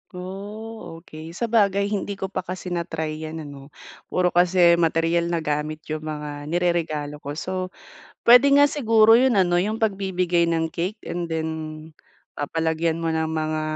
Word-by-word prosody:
Oh, 195 -1 -8
okey. 160 +1 -10
Sabagay 205 -3 +1
hindi 205 0 -2
ko 190 0 -5
pa 190 - -2
kasi 185 0 -6
na-try 160 -2 -3
'yan 160 0 -6
ano. 140 -2 -10 0.4
Puro 180 -1 +1
kasi 175 -1 +4
materyal 165 +1 +1
na 170 -1 -1
gamit 150 +1 -2
yung 155 - -2
mga 150 -1 -6
nireregalo 160 -4 -1
ko. 145 0 -6
So, 185 +2 -3 0.5
pwede 250 +4 +7
nga 285 +1 +6
siguro 225 -5 +5
yun 260 0 +3
ano, 180 -4 +3
yung 215 +5 -1
pagbibigay 185 -4 +1
ng 165 -1 0
cake 185 +7 -4
and 170 +1 -3
then 160 -1 -2 0.9
papalagyan 160 +2 -1
mo 165 - 0
ng 160 0 0
mga 155 0 -1
170 Hz, 155 wpm, -23 LUFS, 160-195 Hz, 0.9 s, pwede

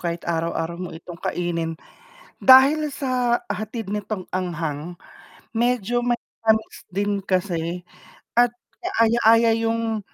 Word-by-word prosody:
kahit 170 -1 -4
araw 165 0 0
araw 165 +1 -3
mo 180 - -5
itong 170 +1 -10
kainin, 165 -2 -2 0.7
dahil 280 +3 +7
sa 250 -3 0
hatid 215 0 -4
nitong 210 -2 -4
anghang, 170 -2 -3 0.6
medyo 240 0 +1
may 240 -1 +1 0.2
tamis 220 0 +1 0.2
din 200 +1 0
kasi 180 -2 -1 0.6
at 240 0 +5 0.3
kaaya 235 - +2
-aya 230 +1 +6 0.2
yung 225 -1 -1
210 Hz, 120 wpm, -23 LUFS, 175-240 Hz, 0.7 s, dahil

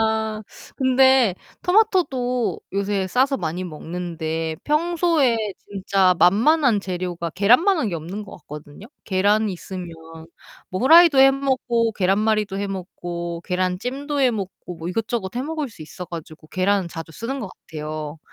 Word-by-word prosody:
아 220 -1 0 0.3
근데 260 -5 +4 0.3
토마토도 285 - +1
요새 200 -1 -1
싸서 265 +7 +2
많이 175 -1 -3
먹는데 160 -1 -4
평소에 320 -4 +2 0.3
진짜 195 -2 +2
만만한 230 - +4
재료가 175 -3 -4
계란만 250 - +4
한 230 - 0
게 175 - -3
없는 175 +6 -5
것 195 - -11
같거든요. 150 +4 -11 0.2
계란 205 +2 +2
있으면 185 0 -6 0.8
뭐 185 - -3
후라이도 320 +1 +7
해 270 0 +8
먹고 255 -4 0
계란말이도 205 +1 +1
해 200 - -2
먹고 175 -3 -5
계란찜도 250 +11 -2
해 255 -2 +4
먹고 190 -4 -6
뭐 165 +2 -6
이것저것 220 0 -3
해 250 - -1
먹을 305 -2 -3
수 205 - -12
있어 165 +4 -8
가지고 160 -2 -9
계란 190 -1 +1
자주 165 0 -8
쓰는 260 - -4
것 200 - -5 0.2
같아요. 155 -1 -6
200 Hz, 300 characters per minute, -22 LUFS, 180-260 Hz, 0.8 s, 해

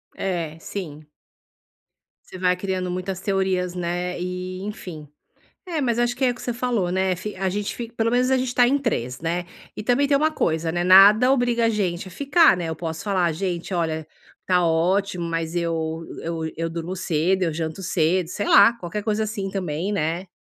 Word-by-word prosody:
É, 170 -4 -3
sim. 155 -5 -7 1.2
Você 185 - -10
vai 180 0 +2
criando 185 -1 -3
muitas 185 +1 -3
teorias, 190 -2 0
né, 180 0 -3
e, 180 +1 -4
enfim. 180 -7 -7 0.6
É, 330 -5 -2
mas 240 -3 +1
acho 240 0 +1
que 265 - -3
é 255 - +5
o 245 - -2
que - - -12
você 245 - -2
falou, 230 -7 -1
né, 190 0 +1
fi 210 +4 -6
a 190 0 -1
gente 205 +2 -3
fi 235 -1 -6
pelo 230 0 0
menos 250 +1 +2
a 265 - +3
gente 255 -1 -2
tá 245 -1 +5
em 275 +3 +3
3, 130 - -2
né. 170 +2 -2 0.3
E - - -5
também 255 +4 +2
tem 280 - +3
uma 310 +3 +2
coisa, 160 - 0
né, 175 +1 -1
nada 205 +7 +7
obriga 245 -3 +2
a 225 - +3
gente 190 -4 -1
a - - -11
ficar, 285 - +4
né. 170 -2 -3
Eu 160 - -3
posso 160 +2 -5
falar: 185 -5 +1
"Gente, 180 +1 -3
olha, 160 -2 -1 0.4
tá 180 -1 +3
ótimo, 175 +2 +1
mas 165 0 -3
eu 165 -1 -2 0.2
eu 165 0 -3 0.2
eu 165 0 -2
durmo 170 +3 -5
cedo, 180 +1 0
eu 165 -3 0
janto 160 +3 -4
cedo", 175 0 +1
sei 205 - -3
lá, 200 +3 +7
qualquer 205 -1 -5
coisa 215 0 0
assim 205 -2 -3
também, 180 -1 -3
né. 175 -1 -1
185 Hz, 200 wpm, -23 LUFS, 170-215 Hz, 1.2 s, nada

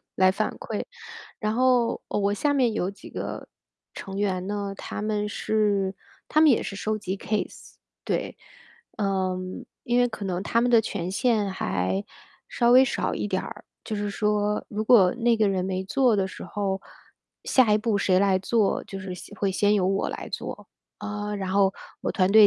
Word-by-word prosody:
来 185 0 +5
反 - - -1
馈。 - - -4 0.6
然 215 -2 -1
后， 250 -1 +2
呃， - - -1
我 200 0 +1
下 290 +7 +1
面 255 -5 +2
有 190 -2 -1
几 200 - -13
个 - - -5 0.5
成 195 0 -6
员 190 -2 -1
呢， 200 -1 -3
他 - - -6
们 210 0 -1
是 205 -3 0 0.3
他 310 - +3
们 315 - +7
也 245 - +3
是 195 - -5
收 215 +2 -1
集 195 -2 -3
case， 210 +1 -4 0.3
对。 - - -2 0.6
嗯， 185 -2 -2 0.2
因 240 +1 +2
为 245 - +5
可 220 -3 -7
能 185 -1 -2
他 230 +3 +1
们 245 +1 +2
的 230 -2 +6
权 185 -4 -3
限 210 -1 +1
还 95 - -1 0.4
稍 240 0 +3
微 260 +1 +8
少 245 - -1
一 - - -2
点 190 -2 -1
儿。 - - -9 0.2
就 215 - -3
是 205 0 -2
说， 210 0 0
如 215 +1 -3
果 200 -6 +6
那 235 -1 +3
个 215 -2 +3
人 190 -2 0
没 185 0 -2
做 250 +3 +3
的 190 -1 +1
时 - - -9
候， 195 -2 -2 0.6
下 250 -5 +4
一 210 - +4
步 215 -1 0
谁 185 -2 +3
来 195 -1 +3
做， 210 +1 +1
就 195 - -7
是 190 -1 -5
先 205 - -10
会 200 -2 0
先 205 +2 +3
由 190 -3 +2
我 195 0 0
来 - - -6
做。 - - -6 0.3
啊， 210 0 -4
然 190 -2 -3
后 195 0 +3 0.3
我 - - -2
团 185 -1 +2
队 215 0 +9
205 Hz, 215 characters per minute, -26 LUFS, 190-220 Hz, 0.6 s, 队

